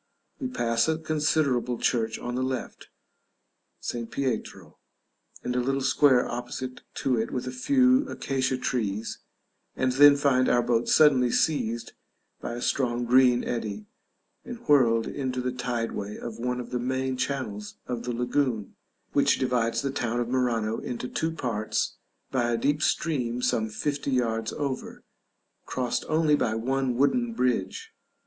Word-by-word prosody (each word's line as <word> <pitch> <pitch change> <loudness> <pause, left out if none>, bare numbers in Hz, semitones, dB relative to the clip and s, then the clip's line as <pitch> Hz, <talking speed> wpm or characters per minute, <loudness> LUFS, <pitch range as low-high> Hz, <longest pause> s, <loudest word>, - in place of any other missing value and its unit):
We 260 - -2
pass 115 - +1
a 160 0 +1
considerable 150 -6 +1
church 115 -2 0
on 120 - -5
the 125 - -1
left, 130 0 -4 0.9
St. 115 -1 -4
Pietro, 130 -5 -4 0.6
and 125 - -2
a - - +2
little 135 +2 0
square 130 -1 +4
opposite 125 +1 -5
to 125 -3 +1
it 110 - -1
with 125 - -3
a 130 - -4
few 255 - +3
acacia 130 -1 -1
trees, 110 -4 -2 0.6
and 130 0 +1
then 145 +2 +8
find 130 -3 +3
our 120 0 +3
boat 120 -1 +1
suddenly 135 -5 +5
seized 115 -5 0 0.5
by - - -5
a 120 - -5
strong 120 -2 0
green 125 0 +5
eddy, 105 -3 -3 0.6
and 245 - -7
whirled 115 -6 +4
into 130 -2 -3
the 125 0 -1
tide 120 -2 -2
way 105 +1 -5
of 115 -2 -7
one 125 +1 -1
of 125 - -7
the 125 - -1
main 130 +1 -1
channels 115 -6 -3
of 120 -2 -3
the 125 - -3
lagoon, 120 -3 -1 0.4
which 140 - +3
divides 120 -2 0
the 135 - -1
town 120 -3 -1
of 120 - -1
Murano 115 -4 0
into 125 0 -5
two 160 - -1
parts 115 -9 -2 0.3
by 120 -3 +1
a 120 - +1
deep 145 +5 +1
stream 125 -7 0
some 110 -3 0
fifty 140 +6 -2
yards 115 -4 0
over, 140 -3 -4 0.6
crossed 125 -2 -2
only 155 -1 +3
by 110 -6 +2
one 130 +2 0
wooden 230 - +2
bridge. 230 - -1
125 Hz, 155 wpm, -27 LUFS, 120-140 Hz, 0.9 s, then